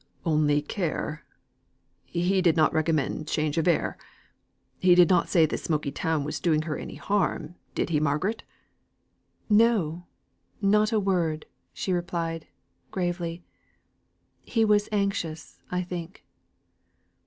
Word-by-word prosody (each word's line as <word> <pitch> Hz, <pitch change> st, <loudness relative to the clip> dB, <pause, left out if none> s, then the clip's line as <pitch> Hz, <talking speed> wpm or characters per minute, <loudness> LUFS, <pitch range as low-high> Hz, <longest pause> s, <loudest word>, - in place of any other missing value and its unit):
"Only 150 Hz, -2 st, +2 dB
care? 155 Hz, -3 st, -3 dB, 0.8 s
he 180 Hz, +2 st, +1 dB
did 170 Hz, -2 st, +3 dB
not 155 Hz, -, +4 dB
recommend 155 Hz, -1 st, 0 dB
change 155 Hz, +1 st, 0 dB
of 165 Hz, -, 0 dB
air? 170 Hz, -, +1 dB, 0.8 s
he 180 Hz, -1 st, +5 dB
did 180 Hz, 0 st, +6 dB
not 180 Hz, -2 st, +3 dB
say 165 Hz, -4 st, +5 dB
this 155 Hz, -, -3 dB
smoky 150 Hz, -3 st, -1 dB
town 160 Hz, +1 st, -1 dB
was 150 Hz, -, -4 dB
doing 155 Hz, -3 st, +2 dB
her 155 Hz, -2 st, -3 dB
any -, -, -7 dB
harm, 185 Hz, -5 st, -1 dB, 0.2 s
did -, -, 0 dB
he, 150 Hz, -, +3 dB
Margaret?" 155 Hz, +9 st, 0 dB, 1.1 s
"No! 205 Hz, -7 st, +3 dB, 0.5 s
not 210 Hz, +2 st, +3 dB
a 220 Hz, -, +3 dB
word," 175 Hz, -6 st, 0 dB, 0.3 s
she 185 Hz, -, -2 dB
replied, 170 Hz, -2 st, -2 dB, 0.4 s
gravely. 175 Hz, -2 st, -3 dB, 1.0 s
"He 225 Hz, -2 st, +1 dB
was 210 Hz, -1 st, +3 dB
anxious, 195 Hz, -6 st, -2 dB
I 180 Hz, 0 st, -1 dB
think." 175 Hz, +1 st, -7 dB
170 Hz, 125 wpm, -27 LUFS, 155-190 Hz, 1.1 s, did